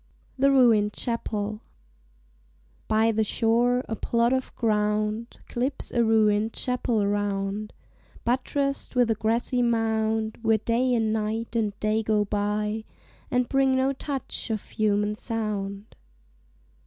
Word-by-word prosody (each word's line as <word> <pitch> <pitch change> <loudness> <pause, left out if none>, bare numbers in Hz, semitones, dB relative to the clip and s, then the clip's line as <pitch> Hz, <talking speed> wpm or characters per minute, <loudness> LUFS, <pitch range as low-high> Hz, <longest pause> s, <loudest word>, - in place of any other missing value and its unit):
THE 275 +1 +3
RUINED 230 -6 +4
CHAPEL 215 -2 -3 1.3
By 220 +1 +3
the 220 0 +1
shore, 240 +4 +1
a 225 - -3
plot 235 +2 +1
of 260 0 -1
ground 215 0 0
Clips 260 +3 -3
a 235 - +2
ruin'd 220 -1 +3
chapel 245 -4 0
round, 205 0 -1 0.5
Buttress'd 275 +3 -1
with 245 -2 +3
a - - +4
grassy 230 +3 +1
mound; 220 -2 0
Where 225 -1 +3
Day 240 +3 +1
and 220 -2 +1
Night 220 +2 -2
and 210 -3 -1
Day 215 +1 +1
go 215 -1 +1
by, 210 +1 -1 0.5
And 250 -1 +1
bring 270 -1 +2
no 265 +1 +2
touch 275 -2 -4
of 215 -2 -3
human 210 -1 +1
sound. 210 -3 -4
220 Hz, 125 wpm, -26 LUFS, 210-240 Hz, 1.3 s, RUINED